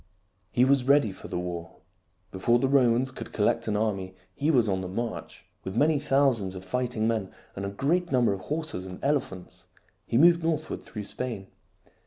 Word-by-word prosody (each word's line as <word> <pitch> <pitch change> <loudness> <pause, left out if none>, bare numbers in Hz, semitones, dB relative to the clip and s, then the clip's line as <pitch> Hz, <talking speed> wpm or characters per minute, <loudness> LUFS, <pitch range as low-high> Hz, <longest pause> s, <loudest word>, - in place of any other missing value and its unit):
He 125 - +4
was 135 -1 +3
ready 140 -6 +4
for 95 - -10
the - - -4
war. 85 -1 -5 0.6
Before 120 +6 +2
the 135 - +1
Romans 130 -1 +3
could - - -8
collect - - +1
an 105 - +1
army 95 -4 -2 0.2
he 145 +8 -1
was 125 -8 +4
on 95 -2 0
the 95 - -4
march. 115 +5 -5 0.2
With 95 +3 -5
many 150 +2 +3
thousands 135 -9 +1
of 95 0 -8
fighting 120 +1 -1
men 110 -4 -1 0.3
and 100 - -4
a - - -3
great 170 - 0
num 125 -2 +3
ber 100 - +3
of 95 - -6
horses 150 - -3
and 90 -1 -8
elephants, 95 -10 -2 0.4
he 115 - +1
moved 170 +4 +6
northward 160 -2 -2
through 105 -2 -7
Spain. 105 -2 -5
115 Hz, 190 wpm, -27 LUFS, 95-140 Hz, 0.6 s, moved